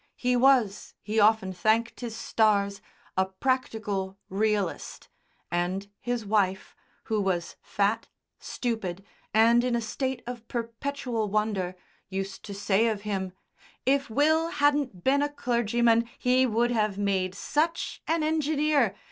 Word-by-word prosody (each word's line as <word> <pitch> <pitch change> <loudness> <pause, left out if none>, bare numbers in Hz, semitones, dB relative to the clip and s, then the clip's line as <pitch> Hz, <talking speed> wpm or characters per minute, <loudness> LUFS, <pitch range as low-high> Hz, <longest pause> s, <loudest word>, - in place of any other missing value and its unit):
He 250 0 +1
was, 245 -5 +3
he 215 +1 0
often 210 -3 +4
thanked 220 +5 +1
his 235 -3 -5
stars, 200 -3 +1 0.3
a 190 0 +2
practical 205 -3 -2
Realist, 205 -1 -1 0.4
and 180 +3 -1
his 245 -3 -3
wife, 195 -2 0 0.3
who 220 -2 -1
was 180 -3 -1
fat, 205 +2 0 0.3
stupid, 200 -6 -4 0.3
and 230 +2 +5
in 250 -1 +1
a - - +1
state 245 +3 -3
of 240 -2 -7
perpetual 235 -1 -3
wonder, 200 -3 -1 0.3
used 195 0 -4
to 205 - -6
say 200 +2 +2
of 215 -3 -1
him, 190 -3 -3 0.5
"If 275 +1 +2
Will 315 +7 +3
hadn't 290 - +1
been 280 +2 +3
a 290 - +1
clergyman 235 -3 +1
he 255 +1 +3
would 235 +1 +1
have 215 -4 0
made 190 -2 0
such 315 +9 -1
an 325 -1 +1
engineer. 305 -6 +2
225 Hz, 130 wpm, -27 LUFS, 200-250 Hz, 0.5 s, and